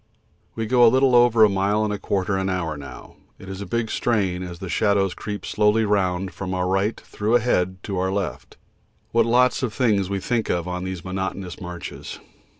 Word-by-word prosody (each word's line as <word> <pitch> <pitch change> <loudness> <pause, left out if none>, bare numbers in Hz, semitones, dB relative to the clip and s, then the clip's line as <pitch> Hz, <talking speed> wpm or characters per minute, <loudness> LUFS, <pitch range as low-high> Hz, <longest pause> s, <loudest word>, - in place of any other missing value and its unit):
We 115 - -2
go 120 +1 +5
little 130 +2 +4
over 120 -2 +6
a - - +8
mile 100 +2 +1
and 105 - -1
a 100 - -4
quarter 95 0 -1
an 95 0 -1
hour 85 -4 -2
now 70 -1 -11 0.2
it 95 - -13
is 95 +1 -6
a 100 - -6
big 115 -2 -1
strain 95 -7 0
as 90 -2 -6
the 95 - -7
shadows 100 +2 +1
creep 105 -3 -6
slowly 105 +1 +2
round 95 -2 0
from 95 -1 -4
our 90 0 0
right 95 +4 0
through 110 +3 -1
ahead 95 -7 +1
to 100 -3 -3
our 95 +1 0
left. 95 -9 -4 0.5
What 115 0 +3
lots 125 +2 +3
of 120 -5 -2
things 105 -7 +2
we 100 -1 -1
think 115 +3 -1
of 85 0 -1
on 90 0 -3
these 95 -2 -5
monotonous 95 -1 -4
marches! 90 -1 -7
100 Hz, 200 wpm, -23 LUFS, 95-110 Hz, 0.5 s, a